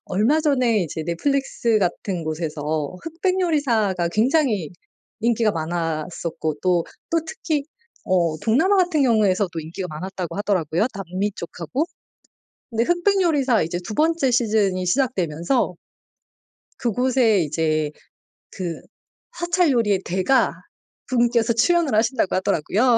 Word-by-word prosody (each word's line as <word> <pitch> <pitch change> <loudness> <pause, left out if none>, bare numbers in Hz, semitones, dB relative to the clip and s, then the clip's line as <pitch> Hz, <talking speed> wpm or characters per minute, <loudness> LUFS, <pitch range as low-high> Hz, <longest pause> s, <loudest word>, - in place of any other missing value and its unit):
얼마 225 +12 +2
전에 255 -7 +2
이제 160 +1 -5
넷플릭스 235 - 0
같은 180 -2 -2
곳에서 155 0 -3
흑백요리사가 295 - 0
굉장히 220 - +1 0.5
인기가 230 -1 +2
많았었고 165 -1 -3
또, 180 -2 +2 0.3
또 335 - +3
특히 310 -2 -2 0.4
어 170 -4 +1
동남아 270 - +3
같은 350 -5 +2
경우에서도 210 -6 +2
인기가 170 +4 -6
많았다고 180 +3 -5
하더라고요, 190 -1 +1
남미 195 +2 -3
쪽하고. 170 - -3 0.9
근데 230 0 +1
흑백요리사 345 - +2
이제 170 +2 -3
두 215 - -6
번째 320 -3 +2
시즌이 210 -6 +1
시작되면서 180 - 0 1.1
그곳에 245 -2 +2
이제 155 -1 0 0.6
그 175 -3 -5 0.6
사찰 345 -2 +2
요리의 210 -6 +2
대가 190 +9 +2 0.6
분께서 240 -2 +2
출연을 325 +4 +2
하신다고 225 -2 +1
하더라고요. 210 +7 +2
215 Hz, 290 characters per minute, -22 LUFS, 175-265 Hz, 1.1 s, 또